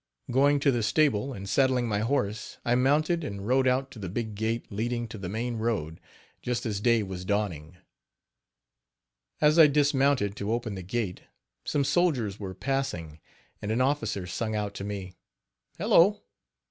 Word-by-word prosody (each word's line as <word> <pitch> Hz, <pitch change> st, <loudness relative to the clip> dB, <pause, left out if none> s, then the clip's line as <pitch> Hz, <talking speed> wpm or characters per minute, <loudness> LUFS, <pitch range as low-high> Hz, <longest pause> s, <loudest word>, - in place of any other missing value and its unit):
Going 140 Hz, +3 st, +4 dB
to 140 Hz, -, +4 dB
the 120 Hz, -2 st, 0 dB
stable 135 Hz, 0 st, +2 dB
and 100 Hz, -6 st, -7 dB
saddling 130 Hz, +1 st, +2 dB
my 105 Hz, -2 st, 0 dB
horse, 110 Hz, -3 st, -1 dB
I 120 Hz, -, +2 dB
mounted 150 Hz, +7 st, +2 dB
and 100 Hz, -7 st, -5 dB
rode 130 Hz, +1 st, +3 dB
out 130 Hz, +1 st, +1 dB
to 115 Hz, -, -11 dB
the 95 Hz, -3 st, -5 dB
big 110 Hz, +3 st, -3 dB
gate 110 Hz, +3 st, -2 dB
leading 120 Hz, +3 st, -2 dB
to 110 Hz, -, -8 dB
the 90 Hz, -2 st, -5 dB
main 115 Hz, +3 st, -3 dB
road, 100 Hz, -8 st, -2 dB, 0.4 s
just 125 Hz, 0 st, -2 dB
as 105 Hz, -3 st, -2 dB
day 115 Hz, -1 st, +3 dB
was 95 Hz, -2 st, -6 dB
dawning. 90 Hz, -5 st, -2 dB, 1.6 s
As 150 Hz, +2 st, +5 dB
I 160 Hz, -, +10 dB
dismounted 140 Hz, -7 st, +2 dB
to 100 Hz, +2 st, -1 dB
open 115 Hz, -2 st, -2 dB
the 95 Hz, -, -6 dB
gate, 95 Hz, 0 st, -3 dB, 0.4 s
some 145 Hz, -, +1 dB
soldiers 135 Hz, -, +1 dB
were 95 Hz, -3 st, -6 dB
passing 105 Hz, -, -3 dB, 0.4 s
and 105 Hz, -, -3 dB
an 115 Hz, -, 0 dB
officer 115 Hz, -8 st, 0 dB
sung 110 Hz, +4 st, -3 dB
out 105 Hz, -1 st, -2 dB
to 100 Hz, -, -6 dB
me, 100 Hz, -3 st, -5 dB, 0.6 s
"Hello! 205 Hz, +5 st, +4 dB
115 Hz, 165 wpm, -28 LUFS, 100-135 Hz, 1.6 s, I